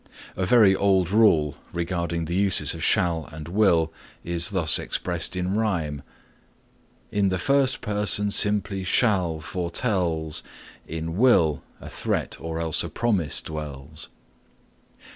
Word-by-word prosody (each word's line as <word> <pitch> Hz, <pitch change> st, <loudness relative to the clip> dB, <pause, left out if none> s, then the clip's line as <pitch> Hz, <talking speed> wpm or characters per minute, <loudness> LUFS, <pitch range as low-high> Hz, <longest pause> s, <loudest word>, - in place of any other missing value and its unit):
A 90 Hz, -1 st, -2 dB
very 105 Hz, -4 st, +5 dB
old 95 Hz, -2 st, +1 dB
rule 85 Hz, -10 st, +3 dB
regarding 85 Hz, -1 st, -3 dB
the 85 Hz, -, -5 dB
uses 95 Hz, 0 st, +3 dB
of -, -, -7 dB
shall 85 Hz, -3 st, +1 dB
and 75 Hz, 0 st, -9 dB
will 85 Hz, -4 st, +2 dB, 0.3 s
is 85 Hz, 0 st, +1 dB
thus 85 Hz, -6 st, +4 dB
expressed -, -, -2 dB
in 90 Hz, +1 st, -2 dB
rhyme: 85 Hz, -10 st, -2 dB, 1.1 s
In 100 Hz, -1 st, +1 dB
the 95 Hz, -1 st, 0 dB
first 135 Hz, +4 st, +1 dB
person 105 Hz, -1 st, 0 dB
simply 100 Hz, -2 st, +1 dB
shall 95 Hz, -6 st, +1 dB
foretells, 85 Hz, -3 st, -2 dB, 0.5 s
In 80 Hz, +1 st, -5 dB
will 90 Hz, -, +3 dB, 0.2 s
a -, -, -11 dB
threat -, -, -3 dB
or 80 Hz, 0 st, -5 dB
else 80 Hz, -2 st, +1 dB
a -, -, -5 dB
promise 100 Hz, -, 0 dB
dwells. 75 Hz, -3 st, -8 dB
90 Hz, 125 wpm, -24 LUFS, 80-100 Hz, 1.1 s, very